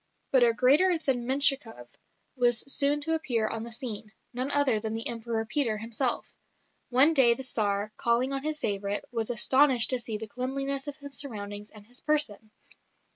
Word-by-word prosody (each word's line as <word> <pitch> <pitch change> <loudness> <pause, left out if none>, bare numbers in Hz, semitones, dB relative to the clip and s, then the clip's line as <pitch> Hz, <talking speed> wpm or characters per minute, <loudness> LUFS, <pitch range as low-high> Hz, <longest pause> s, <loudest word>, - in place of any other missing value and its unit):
But 260 - +4
a 240 -1 +5
greater 290 +10 +3
than 255 -6 -2
Menshikoff 265 - +3 0.5
was 240 -3 +3
soon 285 +1 +3
to 325 +2 -1
appear 240 -9 -1
on 225 0 -4
the 235 - -8
scene 220 -2 -5 0.2
none 255 +3 -2
other 285 -6 +2
than 220 +1 -5
the 225 - -1
Emperor 230 -1 -3
Peter 240 -2 -1
himself. 230 +3 -1 0.6
One 265 +6 +4
day 245 -5 +4
the 265 - -8
Tsar, 210 -4 -2
calling 240 +3 0
on 270 - -3
his 305 +1 -2
favourite, 200 -6 -3
was 230 -2 -3
astonished 260 +1 +4
to 255 - -1
see 225 -2 -4
the 220 - -7
cleanliness 270 +4 -3
of 290 - -5
his 285 -2 -9
surroundings 205 -6 -5
and 210 -1 -14
his 245 +3 -11
person. 290 -8 -1
245 Hz, 180 wpm, -27 LUFS, 220-275 Hz, 0.6 s, a